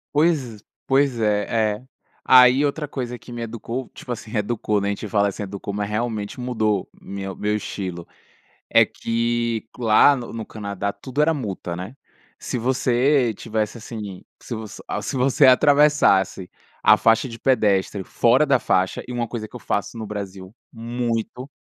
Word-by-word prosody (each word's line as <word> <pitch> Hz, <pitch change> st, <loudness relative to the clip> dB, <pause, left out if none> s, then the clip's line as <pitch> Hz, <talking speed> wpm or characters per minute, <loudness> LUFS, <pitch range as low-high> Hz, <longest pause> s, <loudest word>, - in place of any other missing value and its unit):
Pois 145 Hz, -9 st, +1 dB, 0.3 s
pois 135 Hz, -2 st, +2 dB
é, 105 Hz, 0 st, +1 dB
é. 110 Hz, -, -13 dB, 0.4 s
Aí 130 Hz, +2 st, +7 dB
outra 150 Hz, +1 st, -1 dB
coisa 125 Hz, -3 st, -5 dB
que 120 Hz, -, -14 dB
me 120 Hz, -1 st, -6 dB
educou, 115 Hz, +2 st, -5 dB
tipo 125 Hz, -, -9 dB
assim, 115 Hz, -2 st, -6 dB
reeducou 105 Hz, -1 st, -1 dB
né, 100 Hz, -, -1 dB
a -, -, +1 dB
gente 100 Hz, +2 st, -5 dB
fala 100 Hz, 0 st, +2 dB
assim 100 Hz, -, -6 dB
“educou”, 100 Hz, 0 st, -6 dB
mas 105 Hz, 0 st, -2 dB
realmente 110 Hz, -1 st, -3 dB
mudou 110 Hz, -5 st, 0 dB
meu 95 Hz, 0 st, -6 dB
meu 105 Hz, 0 st, -1 dB
estilo. 95 Hz, -4 st, -5 dB, 0.6 s
É -, -, +6 dB
que 115 Hz, -1 st, -1 dB
lá 120 Hz, +4 st, +5 dB
no 125 Hz, -3 st, -6 dB
no 115 Hz, -1 st, -4 dB
Canadá 100 Hz, -2 st, -4 dB
tudo 130 Hz, +8 st, -2 dB
era 160 Hz, +2 st, +4 dB
multa, 100 Hz, -, -4 dB
né, 95 Hz, +9 st, -7 dB, 0.4 s
se -, -, -4 dB
você 130 Hz, +1 st, +2 dB
estivesse 110 Hz, +1 st, -3 dB
assim 105 Hz, -4 st, -7 dB, 0.2 s
se 120 Hz, -, -6 dB
você 110 Hz, -2 st, -8 dB
a -, -, -3 dB
se -, -, -4 dB
você 135 Hz, +2 st, +4 dB
atravessasse 130 Hz, -9 st, +4 dB, 0.3 s
a 110 Hz, -, +7 dB
faixa 115 Hz, +3 st, +3 dB
de 115 Hz, -1 st, -9 dB
pedestre 100 Hz, -6 st, +1 dB
fora 120 Hz, +9 st, +3 dB
da 140 Hz, -3 st, +3 dB
faixa, 95 Hz, -5 st, 0 dB
e -, -, -7 dB
é -, -, -4 dB
uma 120 Hz, -1 st, -1 dB
coisa 110 Hz, -2 st, -6 dB
que 125 Hz, -, -11 dB
eu -, -, -9 dB
faço 105 Hz, +3 st, -2 dB
no 110 Hz, -1 st, -5 dB
Brasil, 100 Hz, -2 st, -7 dB, 0.2 s
muito 120 Hz, +1 st, -3 dB
115 Hz, 170 wpm, -22 LUFS, 105-125 Hz, 0.6 s, Aí